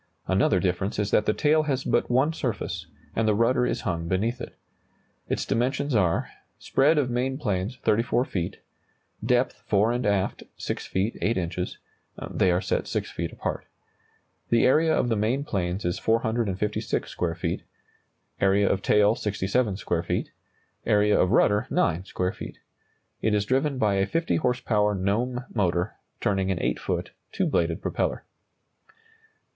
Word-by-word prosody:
Another 95 0 +3
difference 95 +2 -1
is 105 0 -1
that - - +3
the - - +5
tail 155 +5 +3
has 135 -1 0
but - - +1
one 135 +6 +3
surface, 130 -8 -3 0.3
and 110 0 +1
the 105 - +3
rudder 125 +3 +3
is - - -2
hung 85 -1 -2
beneath 110 +7 0
it. - - -8 0.7
Its - - -1
dimensions 130 +5 0
are: 90 -7 +1 0.3
Spread 150 +4 +2
of 130 -4 +1
main 130 +2 0
planes, 105 -3 -2
34 120 +3 +2
feet; 90 -2 -4 0.6
depth 125 0 +1
(fore 105 +2 +3
and 120 -2 -1
aft), 100 -2 0 0.2
6 - - -4
feet 100 +5 -1
8 110 0 +1
inches; 90 0 -3 0.5
they 95 - +2
are 90 +1 +2
set - - -1
6 - - -2
feet 85 0 -4
apart. - - -4 0.8
The 115 -1 +4
area 160 +5 +4
of 140 - +2
the 115 - +2
main 115 +7 0
planes 95 -6 -2
is 90 0 -1
456 110 -3 0
square 85 -2 -2
feet; 85 -1 -2 0.8
area 100 +1 +3
of 95 - +1
tail, 105 +1 +4
67 100 0 0
square 85 -4 -1
feet; - - -2 0.5
area 105 0 +3
of 90 - +3
rudder, 105 +4 +3
9 95 - +1
square 90 -1 -1
feet. - - -8 0.6
It 110 -1 +2
is 105 -1 +1
driven 135 +4 +1
by 105 -5 +2
a 95 0 +2
50 165 +8 0
horsepower 115 -6 +1
Gnome 120 +7 -1
motor, 90 -2 0 0.2
turning 95 -2 0
an 95 -3 0
8 - - -1
foot, - - -3 0.2
two - - 0
bladed 85 +2 0
propeller. - - -1
105 Hz, 160 wpm, -26 LUFS, 95-125 Hz, 0.8 s, the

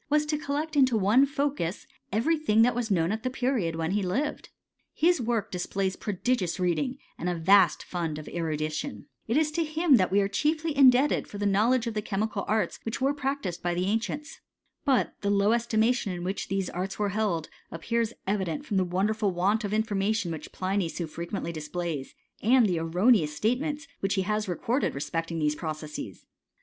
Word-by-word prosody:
Collect 300 +3 -2
into 260 -5 +4
one 220 +8 +4
focus, 275 - -2 0.3
every 230 - +2
thing 225 -8 +3
that 245 - +3
was 240 -1 -2
knoti 190 +3 +1
the 255 - -1
period 245 -10 -1
when 165 +1 -2
he 205 +1 +1
lived. 255 +12 -2 0.5
His 340 -2 +3
work 230 -2 -1
displays 190 +1 -2
gious 205 -3 -1
reading, 215 +10 0 0.2
and 180 - -1
a 175 - -1
vast 175 0 +4
fund 165 -4 -3
of 155 - -8
erudition, 155 -9 -3 0.2
him 310 +3 +2
that 185 -3 +1
we 200 - +4
are 200 - +2
chiefly 310 +8 0
indebted 270 +1 +5
for 205 - -8
the 205 - -2
knowl 210 +6 +3
the 225 -3 -2
chemical 205 0 -2
arts 215 0 0
which 225 - -4
were 270 +2 +2
practised 270 - -3
by 175 0 -1
the 180 +1 0
an< 225 +8 -1 0.6
But 270 -3 +2
the 200 - 0
low 200 +1 +3
estimation 230 -1 +1
in 175 -1 -5
which 190 +2 -3
these 195 -1 -1
arts 185 +2 -4
were" 205 -2 -1 0.6
appears 230 +7 -1
evident 190 -6 -1
from 200 - -1
the 190 - +3
wonderful 200 +4 0
want 195 +5 +1
of 205 - -2
infi 215 -1 0
tion 180 -6 -2
which 155 -2 -7
Pliny 190 -2 -1
so 170 +2 -4
frequently 170 +3 -5
displays, 155 -2 -4 0.3
aild*' 235 -3 +5
erroneous 165 0 +2
statements 290 - -1
which 195 0 0
he 190 - +1
has 210 +2 -1
recorded 230 +9 0
resp6^ 165 +4 -2
these 150 -1 +2
processes. 155 -1 -6
205 Hz, 170 wpm, -27 LUFS, 175-250 Hz, 0.6 s, indebted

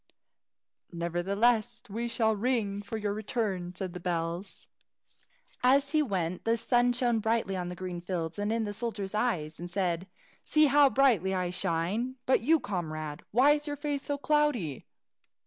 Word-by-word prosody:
"Nevertheless 200 +8 0
we 230 +4 -3
shall 225 -2 +1
ring 210 -3 0
for 205 +2 -5
your 205 -1 -2
return," 205 -5 -2
said 185 -1 -4
the 180 - -6
bells. 170 +2 -3 0.9
As 275 +3 +4
he 310 -1 +3
went, 185 - -2
the 230 +1 +2
sun 245 +1 +3
shone 240 -2 +1
on 195 -5 0
the 180 - -6
green 180 -1 -5
fields, 175 0 -3
and 205 +1 0
in 225 0 0
the 205 -1 -3
soldier's 215 -3 -3
eyes, 175 -10 -1
and 175 +1 -6
said, 180 -1 -1 0.4
"See 305 0 +4
how 285 0 +6
brightly 225 -9 +3
I 180 -1 -1
shine! 180 +9 -1
But 260 - +4
you, 315 +7 +4
comrade, 155 - -4
why 260 +6 +5
is 295 +1 0
your 290 - -2
face 290 -1 -2
so 285 0 -2
cloudy?" 280 - 0
210 Hz, 160 wpm, -29 LUFS, 180-245 Hz, 0.9 s, how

